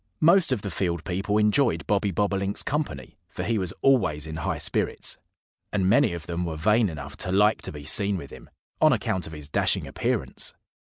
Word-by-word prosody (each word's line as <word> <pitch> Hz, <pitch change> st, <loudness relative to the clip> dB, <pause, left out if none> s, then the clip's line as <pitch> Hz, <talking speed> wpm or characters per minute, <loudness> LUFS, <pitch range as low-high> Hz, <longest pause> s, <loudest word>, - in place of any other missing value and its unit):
Most 170 Hz, -1 st, +5 dB
of 120 Hz, -6 st, -1 dB
the 100 Hz, -, -4 dB
field 85 Hz, -2 st, -2 dB
people 100 Hz, +3 st, -1 dB
enjoyed 110 Hz, +5 st, +2 dB
Bobby 100 Hz, 0 st, +1 dB
Bobolink's 100 Hz, +1 st, -1 dB
company, 150 Hz, +1 st, -4 dB
for -, -, -5 dB
he 115 Hz, -1 st, 0 dB
was 95 Hz, -3 st, 0 dB
always 95 Hz, -, +3 dB
in 80 Hz, 0 st, -6 dB
high 80 Hz, -, -2 dB
spirits. -, -, 0 dB, 0.6 s
And 95 Hz, -3 st, +1 dB
many 120 Hz, +1 st, +4 dB
of 85 Hz, -2 st, -6 dB
them 85 Hz, +1 st, -3 dB
were 80 Hz, -2 st, -4 dB
vain 105 Hz, +6 st, +3 dB
enough 80 Hz, -3 st, -8 dB
to 90 Hz, -, -3 dB
like 105 Hz, +3 st, +3 dB
to -, -, -6 dB
be 75 Hz, -1 st, -9 dB
seen 100 Hz, +5 st, +2 dB
with 70 Hz, -6 st, -9 dB
him, -, -, -12 dB, 0.3 s
on -, -, +6 dB
account 95 Hz, -1 st, -1 dB
of 80 Hz, -, -9 dB
his 75 Hz, -2 st, -8 dB
dashing 70 Hz, -, +1 dB
appearance. -, -, -1 dB
100 Hz, 195 wpm, -25 LUFS, 85-105 Hz, 0.6 s, on